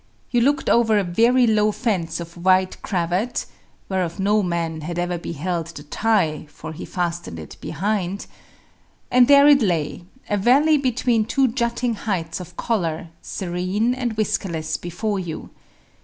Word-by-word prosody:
You 240 - +3
looked 280 +4 +2
over 225 -2 +4
a 205 - +2
very 235 +8 +3
low 215 -1 +3
fence 190 -9 -1
of 170 0 -8
white 185 +1 +2
cravat 185 +5 -1 0.4
(whereof 185 -1 -2
no 205 +2 +3
man 170 -3 -2
had 170 +3 -5
ever 175 0 -1
beheld 170 +1 -3
the 160 -3 -9
tie, 160 -3 0
for 160 +2 -9
he - - -7
fastened 175 - -3
it 80 -2 -9
behind), 195 +2 -2 0.9
and 250 -1 +6
there 280 0 +7
it 285 -2 +7
lay, 175 -4 -1 0.2
a 205 - 0
valley 285 +9 +4
between 245 -4 +1
two 265 +3 +2
jutting 235 0 -1
heights 185 -7 -3
of 180 -1 -10
collar, 170 -8 -1
serene 185 +6 -1
and 245 -4 -3
whiskerless 175 -7 -1
before 195 +4 -3
you. 170 -4 -6
190 Hz, 150 wpm, -22 LUFS, 170-230 Hz, 0.9 s, there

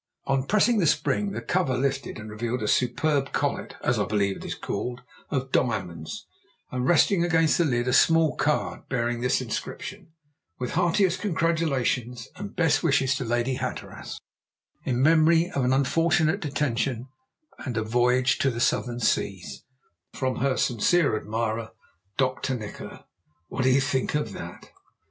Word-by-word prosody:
On 135 -1 0
pressing 215 +2 +3
the 170 - +3
spring 205 +7 +1
the - - -5
cover 175 -9 0
lifted 135 +1 -2
and 110 0 -8
revealed 115 +2 -3
a - - -1
superb 135 +4 +1
collet - - -2
as - - +1
I - - +1
believe 100 -2 0
it - - -10
is - - -4
called 125 0 -4 0.3
of 130 -1 -2
diamonds, 85 -9 -2 0.5
and 125 0 -1
resting 175 +2 +4
against 165 -2 +3
the 170 - +4
lid 120 -3 0
a 125 - +1
small 165 +1 +4
card 150 0 -1
bearing 120 -2 -1
this 125 +1 +1
inscription: 185 - -5 0.5
_"With 125 - -4
heartiest 180 +1 +2
congratulations 145 - 0
and 200 +1 -8
best 165 -4 +2
wishes 135 -5 +2
to - - -3
Lady 120 +2 0
Hatteras, 130 -1 -6 0.7
in 125 0 +1
memory 165 +2 +4
of 135 - -1
an 125 - +2
unfortunate 160 +6 +2
detention 135 - -1 0.5
and 125 -5 -4
a 110 - +1
voyage 125 +3 +2
to 135 - +3
the 120 -2 -4
Southern 120 0 0
Seas,_ 95 - -2 0.5
"From 130 -1 -1
her 130 -1 +1
sincere 140 - +2
admirer, 110 +1 -3 0.4
"Dr. 130 0 0
Nikola." 105 -3 -9 0.4
What 125 - -2
do - - +5
you 130 +1 +4
think 135 0 -1
of 130 -9 -1
that? - - -9
130 Hz, 155 wpm, -26 LUFS, 120-160 Hz, 0.7 s, do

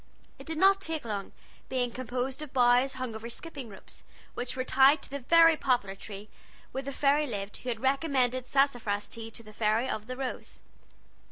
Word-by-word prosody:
It - - -12
did 320 -1 -3
not 390 +3 +5
take 320 -7 -4
long, 205 -3 -4 0.4
being 250 -2 0
composed 255 +3 -3
of 300 -3 -7
boughs 250 +1 +4
hung 255 -3 -4
over 220 +2 -7
skipping 275 -1 -7
ropes, 195 - -12 0.3
which 245 - -4
were 255 - -1
tied 270 +3 +5
to - - -9
the 280 - -3
very 330 +5 +6
poplar 245 -9 0
tree 200 +1 -9 0.4
where 265 - -3
the 275 +1 -5
fairy 290 +2 +2
lived 200 -4 -5
who 250 - -6
had 230 -2 -3
recommended 265 -2 +1
sassafras 245 -8 +1
tea 225 0 -6
to 230 +1 -9
the 215 -1 -13
Fairy 220 +3 +1
of 215 -3 -4
the 255 0 -5
Rose. 265 -1 -6
255 Hz, 190 wpm, -29 LUFS, 225-275 Hz, 0.4 s, very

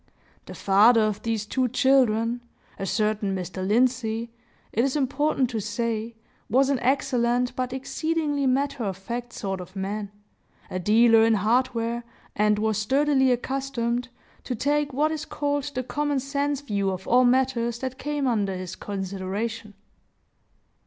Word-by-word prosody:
The - - -8
father 215 +4 +5
of 215 -2 0
these 225 -2 -2
two 255 +4 0
children, 240 -2 +2 0.4
a 195 - -3
certain 210 -1 0
Mr. 185 0 -5
Lindsey, 230 +1 +1 0.4
it 230 - +2
is 270 +1 0
important 275 -2 +1
to 225 - -2
say, 230 +1 -3 0.3
was 270 +3 +3
an 270 - +1
excellent 245 -1 +1
but 255 -1 -2
exceedingly 290 +1 -1
matter 275 0 0
of 195 -3 -3
fact 235 +4 -5
sort 195 -4 -4
of 180 +2 -12
man, 200 +2 -3 0.6
a 185 - -2
dealer 225 +4 +5
in 225 0 +4
hardware, 235 +2 0 0.3
and 210 0 +3
was 215 0 0
sturdily 265 +3 +3
accustomed 250 -1 -2 0.4
to 250 - -2
take 290 +4 0
what 300 +4 +1
is 315 -1 -3
called 285 -2 -2
the 255 - -1
common 290 +2 -1
sense 280 +1 -1
view 200 -8 -1
of 190 0 -5
all 250 +1 +5
matters 245 -2 +2
that 260 +1 -5
came 295 -1 -2
under 205 -6 0
his 185 0 -6
consideration. 200 +2 -4
235 Hz, 145 wpm, -25 LUFS, 215-265 Hz, 0.6 s, father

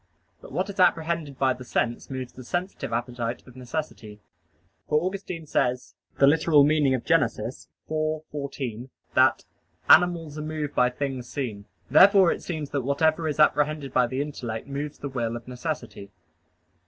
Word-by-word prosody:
But - - -12
what 185 - -1
is 200 0 -8
apprehended 160 -5 +1
by 130 -1 +2
the 125 0 -10
sense 120 -1 -2
moves 130 -2 -5
the 130 - -10
sensitive 175 - -4
appetite 120 0 -3
of 125 - -16
necessity: 125 -5 -6 0.7
for 150 - +4
Augustine 180 -2 -4
says 125 -3 -1 0.3
(Gen. 140 +1 +7
ad 160 - -2
lit. 145 -4 +4
ix, 115 -2 -4 0.2
14) 145 -6 -4 0.2
that 130 -1 +4 0.4
"animals 165 -4 +4
are - - -3
moved 155 -1 -4
by 125 0 +3
things 130 -1 -4
seen." 110 -8 -4 0.3
Therefore 190 +3 +7
it - - -3
seems 155 -5 -5
that 140 - 0
whatever 155 +5 +1
is 150 0 -3
apprehended 150 -2 +2
by 125 -1 +3
the 130 +3 -2
intellect 120 -6 -6
moves 140 +1 -5
the 145 - -5
will 120 -4 -2
of 120 0 -8
necessity. 125 -6 -5
140 Hz, 155 wpm, -26 LUFS, 125-155 Hz, 0.7 s, Gen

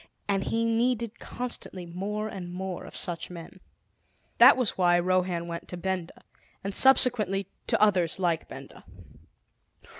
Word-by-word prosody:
And 195 -1 0
he 230 0 0
needed 235 0 0
constantly 235 -7 -6
more 200 +5 -4
and 185 -4 -7
more 185 0 -5
of - - -9
such 170 -2 -3
men. 175 +1 -10 0.8
That - - +9
was 250 -4 +1
why 175 -2 +3
Rohan 180 -1 0
went 170 0 -6
to 180 - -7
Benda, 185 -1 -4 0.4
and 195 +1 -4
subsequently 215 -8 +4 0.2
to - - +1
others 190 -6 +3
like 175 -3 -1
Benda. - - -11
190 Hz, 140 wpm, -27 LUFS, 175-215 Hz, 0.8 s, That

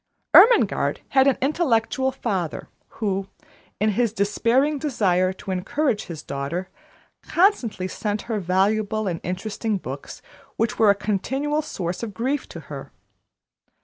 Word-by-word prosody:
Ermengarde 475 +1 +6
had 265 0 +4
an 275 - +3
intellectual 265 -3 +1
father, 195 - -3 0.2
who, 195 -3 -2 0.5
in 215 +1 +2
his 235 +1 +1
despairing 235 +8 +1
desire 190 - +1
to 190 - -7
encourage 215 +6 -1
his 165 -3 -8
daughter, 140 +7 -4 0.5
constantly 300 - +1
sent 205 +2 -3
her 225 -3 -2
valuable 205 +4 +1
and 170 -3 -2
interesting 205 +4 -2
books, 140 -5 -8 0.3
which 225 0 -1
were 220 -2 +6
a 200 - +6
continual 265 +9 -1
source 180 - -4
of 220 -4 -5
grief 265 +5 -2
to - - -8
her. - - -9
215 Hz, 130 wpm, -23 LUFS, 190-265 Hz, 0.5 s, Ermengarde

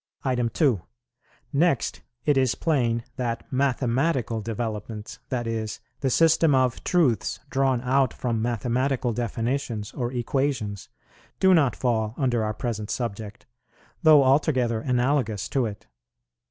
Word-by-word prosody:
2. 130 - +2 0.7
Next, 145 -2 +1 0.2
it 145 - +3
is 130 -3 +2
plain 120 -7 0
that 120 -3 -2
mathematical 130 -2 0
developments, 110 0 -5
that 120 -2 -2
is, 110 -1 -3 0.2
the 135 - 0
system 160 +1 +4
of 130 -2 +1
truths 145 - +1
drawn 135 -2 +2
out 130 +1 +2
from 115 -3 -2
mathematical 120 +2 0
definitions 120 -1 -2
or 120 -1 -3
equations, 120 -4 -2 0.5
do 190 0 +5
not 145 -9 +3
fall 110 -3 0
under 120 -5 +1
our 105 0 -2
present 110 -2 -4
subject, 110 -3 -4 0.6
though 155 -4 +7
altogether 130 -4 +2
analogous 125 -4 0
to 130 -4 +1
it. 105 -1 -9
125 Hz, 120 wpm, -25 LUFS, 115-135 Hz, 0.7 s, though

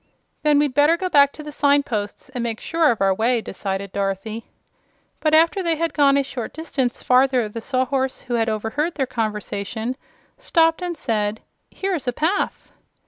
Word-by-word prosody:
"Then 300 -1 +3
we'd 290 -2 +2
better 295 +5 +4
go 370 +1 -2
back 280 -3 +5
to 305 - -9
the 300 - -7
signposts, 280 -8 0
and 255 -2 -5
make 230 -2 -3
sure 325 -2 +2
of 225 -4 0
our 195 -1 +4
way," 230 +5 +1
decided 195 -2 -4
Dorothy. 200 +3 -3 0.7
But 310 0 +3
after 335 +5 +4
they 335 -2 +1
had 330 -1 -1
gone 280 -2 +4
a 280 - +2
short 260 -4 -6
distance 275 -6 -2
farther 255 -2 +3
the 225 +2 -7
Sawhorse, 260 +1 -1
who 250 - -6
had 225 -1 +1
overheard 225 +10 -2
their 270 - 0
conversation, 220 0 -3 0.4
stopped 330 -8 +2
and 350 -2 -3
said: 215 -4 -1 0.3
"Here 390 0 -3
is 290 -7 -3
a 245 - +1
path." 320 +9 -1
260 Hz, 180 wpm, -22 LUFS, 225-305 Hz, 0.7 s, back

